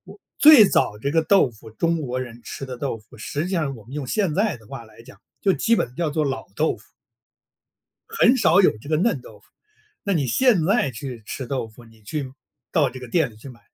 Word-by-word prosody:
我 - - -25 0.2
最 295 -8 +9
早 105 - +1
这 140 +6 -2
个 165 +1 +2
豆 160 -5 +4
腐， 110 0 -15
中 165 +8 -1
国 130 -3 -3
人 120 -2 -8
吃 135 - -7
的 125 -2 -7
豆 135 -4 -3
腐， 105 +1 -18
实 145 +7 -3
际 180 - -5
上 155 -8 -1
我 110 - -14
们 125 - -14
用 145 -2 -4
现 190 - 0
在 205 -4 +1
的 110 -2 -19
话 125 0 -9
来 110 +1 -17
讲， 105 -3 -16 0.2
就 195 - +3
基 230 +4 +2
本 125 - -2
叫 170 +1 -1
做 150 +1 -1
老 135 -1 -3
豆 160 - +1
腐。 - - -21 1.2
很 270 - +4
少 195 -6 +4
有 185 - +5
这 130 - -13
个 155 - +2
嫩 220 +9 +1
豆 - - -14
腐， - - -27 0.6
那 200 - -1
你 150 -7 +1
现 220 - +3
在 195 - +2
去 125 -1 -8
吃 130 - -5
豆 130 -3 -3
腐， 115 +2 -16
你 110 -1 -20
去 135 +5 -5 0.4
到 155 -6 +3
这 130 0 -10
个 125 - -9
店 160 0 +1
里 110 - -18
去 110 +6 -12
买。 120 -3 -13
140 Hz, 260 characters per minute, -23 LUFS, 120-175 Hz, 1.2 s, 最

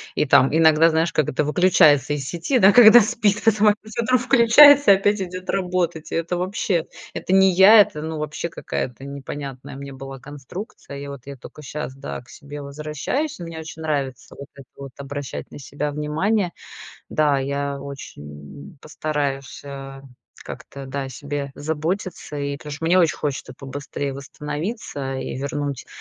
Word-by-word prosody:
и - - +1
там 135 +1 +4
иногда, 160 0 +5
знаешь, 160 +1 +1
как 155 - +1
это 135 - 0
выключается 150 -3 +4
из 145 -2 -3
сети, 180 - 0
да, 195 0 +7
когда 240 0 +9
спит, 210 -1 0
потом 215 -1 +4
опять 215 +1 0
утром 255 +2 +2
включается 270 +1 +7
и - - +5
опять 205 +2 +1
идёт 185 0 -6
работать. 180 -4 -2
Это 165 +1 -1
вообще, 180 -2 -1 0.3
это 185 - -3
не 190 0 +6
я, 195 +4 +8
это, 150 -6 -1
ну, 160 0 -5
вообще 155 +2 -4
какая-то 130 -5 -5
непонятная 140 -1 -7
мне 140 0 -8
была 135 0 -9
конструкция. 145 - -9
И 140 - -7
вот 140 -3 -9
я 140 - -7
только 150 - -13
щас, 145 0 -6
да, 135 -2 -7
к 125 - -23
себе 145 0 -10
возвращаюсь. 150 - -4
Мне 165 -2 -7
очень 160 0 -9
нравится 140 -5 -3
вот 140 - -8
это 135 -2 -14
вот 140 -1 -9
обращать 140 0 -7
на - - -10
себя 145 +2 -4
внимание. 160 +7 -1 0.6
Да, 150 -2 +2
я 140 +1 -3
очень, 140 - -9 0.5
м, 155 - -22
постараюсь, 145 -3 -4
э, 135 -1 -9 0.4
как-то, 140 -1 -9
да, 135 +1 -4
о 135 - -6
себе 140 +1 -5
заботиться 160 +2 -4
и 140 0 -3
потому 150 -1 -9
что 150 +3 -6
мне 180 +3 +4
очень 165 -3 +3
хочется 135 -3 -4
побыстрее 140 +1 -5
восстановиться 150 - -5
и 130 - -5
вернуть 140 0 -4
150 Hz, 170 wpm, -22 LUFS, 140-185 Hz, 0.6 s, когда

